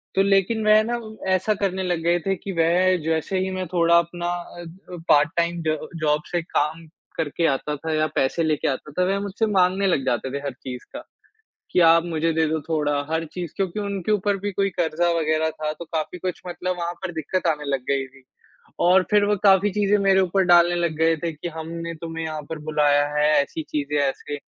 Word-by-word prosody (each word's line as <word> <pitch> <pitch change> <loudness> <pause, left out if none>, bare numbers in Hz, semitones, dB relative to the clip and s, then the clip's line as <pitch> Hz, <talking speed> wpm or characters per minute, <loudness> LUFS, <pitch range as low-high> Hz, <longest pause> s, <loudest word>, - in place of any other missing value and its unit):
तो 195 - +4
लेकिन 200 +3 +2
वह 215 0 +7
ना, 240 +1 -2 0.3
ऐसा 190 +4 +1
करने 190 -1 0
लग 175 -2 -1
गए 175 +1 +2
थे 195 0 +1
कि 195 +2 -7
वह 180 +3 +3
जैसे 160 +4 -1
ही 190 0 -1
मैं 185 0 -3
थोड़ा 170 0 +3
अपना 175 +1 -1
अ 175 0 -5
अ, 180 +1 -11
पार्ट-टाइम 170 +3 +2
ज 155 0 +1 0.3
जॉब 150 0 +2
से 175 -1 0
काम 160 0 -2 0.3
करके 165 +1 -1
आता 150 +2 -1
था 160 +2 -4
या 155 0 +2
पैसे 135 +5 +1
लेके 155 -2 0
आता 145 +2 -3
था, 180 +5 0
वह 195 +1 0
मुझसे 200 +2 -1
माँगने 190 +1 +3
लग 140 -7 +1
जाते 125 +1 -1
थे 140 - -2
हर 140 - -3
चीज़ 125 -1 -8
का, - - -7 0.7
कि, - - +2
"आप 165 0 +6
मुझे 165 -1 0
दे 160 0 +2
दो 160 0 -1
थोड़ा।" 145 -2 +1
हर 165 0 0
चीज़, 175 -4 -5
क्योंकि 195 +1 -2
उनके 200 -1 -2
ऊपर 205 -1 +1
भी 205 +1 -3
कोई 195 +1 0
कर्ज़ा 170 +1 +1
वगैरह 155 0 +1
था, 155 -1 -4
तो 170 - -9
काफ़ी 160 +2 -4
कुछ 185 -1 -4
मतलब 180 +1 -3
वहाँ 170 0 -3
पर 185 - -3
दिक्कत 170 +3 -2
आने 150 -2 0
लग 135 -2 -1
गई 135 -1 +1
थी। 135 0 -20 0.6
और 185 +2 +5
फिर 205 -1 +4
वो 205 0 +2
काफ़ी 195 +1 +5
चीज़ें 210 0 +2
मेरे 195 -1 +4
ऊपर 190 +1 +2
डालने 175 -1 +5
लग 170 -2 -1
गए 165 0 +3
थे 165 +2 -3
कि, 150 +3 -6
"हमने 165 +1 -6
तुम्हें 165 0 -5
यहाँ 155 -1 -4
पर 160 -1 -5
बुलाया 145 -1 +3
है। 150 0 +3
ऐसी 160 +3 -5
चीज़ें, 150 0 -2
ऐसे।" 145 +1 -2
170 Hz, 215 wpm, -23 LUFS, 155-185 Hz, 0.7 s, वह